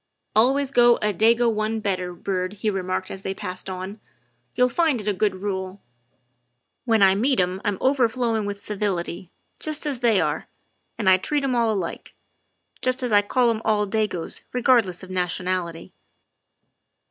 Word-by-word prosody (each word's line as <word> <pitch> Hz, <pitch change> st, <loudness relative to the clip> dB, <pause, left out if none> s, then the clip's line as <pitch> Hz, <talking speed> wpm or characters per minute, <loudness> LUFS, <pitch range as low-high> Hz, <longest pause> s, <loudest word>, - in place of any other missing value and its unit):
"Always 265 Hz, +5 st, +3 dB
go 240 Hz, -2 st, +6 dB
a 210 Hz, -2 st, -1 dB
Dago 230 Hz, +5 st, +3 dB
one 215 Hz, +1 st, -1 dB
better, 185 Hz, -4 st, -2 dB
Byrd, 185 Hz, +1 st, -3 dB
" 205 Hz, -, -17 dB
he 215 Hz, -, +2 dB
remarked 185 Hz, -1 st, -3 dB
as 190 Hz, -, -7 dB
they 195 Hz, 0 st, -4 dB
passed 185 Hz, -2 st, -5 dB
on, 190 Hz, +3 st, -6 dB, 0.3 s
" 120 Hz, +1 st, -44 dB
you'll 250 Hz, -, +4 dB
find 300 Hz, 0 st, +1 dB
it 210 Hz, -, -7 dB
a 210 Hz, -, +2 dB
good 200 Hz, 0 st, 0 dB
rule. 190 Hz, -1 st, -3 dB, 1.1 s
When 225 Hz, -4 st, +4 dB
I 190 Hz, -1 st, +6 dB
meet 245 Hz, +5 st, +1 dB
'em 180 Hz, +1 st, 0 dB
I -, -, -3 dB
'm 205 Hz, -2 st, 0 dB
overflowing 240 Hz, -4 st, +1 dB
with 200 Hz, 0 st, -6 dB
civility, 190 Hz, -3 st, -3 dB, 0.3 s
just 310 Hz, -1 st, -4 dB
as 280 Hz, -4 st, -2 dB
they 230 Hz, -5 st, +3 dB
are, -, -, -1 dB, 0.5 s
and 210 Hz, -, -2 dB
I 185 Hz, 0 st, +7 dB
treat 290 Hz, +9 st, -1 dB
'em 270 Hz, -2 st, 0 dB
all 230 Hz, -2 st, +2 dB
alike, 190 Hz, -5 st, -4 dB, 0.7 s
just 255 Hz, 0 st, 0 dB
as 245 Hz, -, -1 dB
I 205 Hz, -1 st, +6 dB
call 235 Hz, +3 st, +2 dB
'em 220 Hz, -1 st, -3 dB
all 210 Hz, -1 st, +2 dB
Dagos 205 Hz, -5 st, -2 dB
regardless 235 Hz, -8 st, +2 dB
of 185 Hz, -, -10 dB
nationality." 180 Hz, -2 st, -2 dB
210 Hz, 175 wpm, -24 LUFS, 185-235 Hz, 1.1 s, I